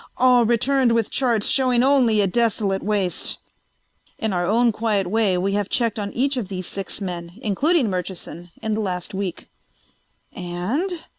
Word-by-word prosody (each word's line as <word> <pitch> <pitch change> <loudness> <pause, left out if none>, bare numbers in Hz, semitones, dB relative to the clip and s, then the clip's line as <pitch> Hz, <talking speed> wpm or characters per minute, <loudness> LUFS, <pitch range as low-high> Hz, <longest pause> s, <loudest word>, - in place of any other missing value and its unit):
All 250 -2 +5
returned 245 +1 +2
with 230 -2 0
charts 235 -6 +1
showing 255 -2 +2
only 255 -6 +4
a - - +3
desolate 205 -2 0
waste. 200 -3 -1 0.8
In 220 -3 -1
our 175 -1 0
own 230 +3 +3
quiet 210 -3 0
way 200 -1 +1
we 190 +2 0
have 205 -1 -1
checked 230 -3 0
on 200 -1 -3
each 275 +2 0
of 230 -6 -2
these 185 -2 -5
six 195 +1 -5
men, 175 -3 -5
including 275 - +2
Murchison, 180 -2 -5
in 220 -1 -1
the 220 - -1
last 180 -3 -3
week." 190 -3 -4 0.9
"And 230 - -3
215 Hz, 160 wpm, -22 LUFS, 190-240 Hz, 0.9 s, All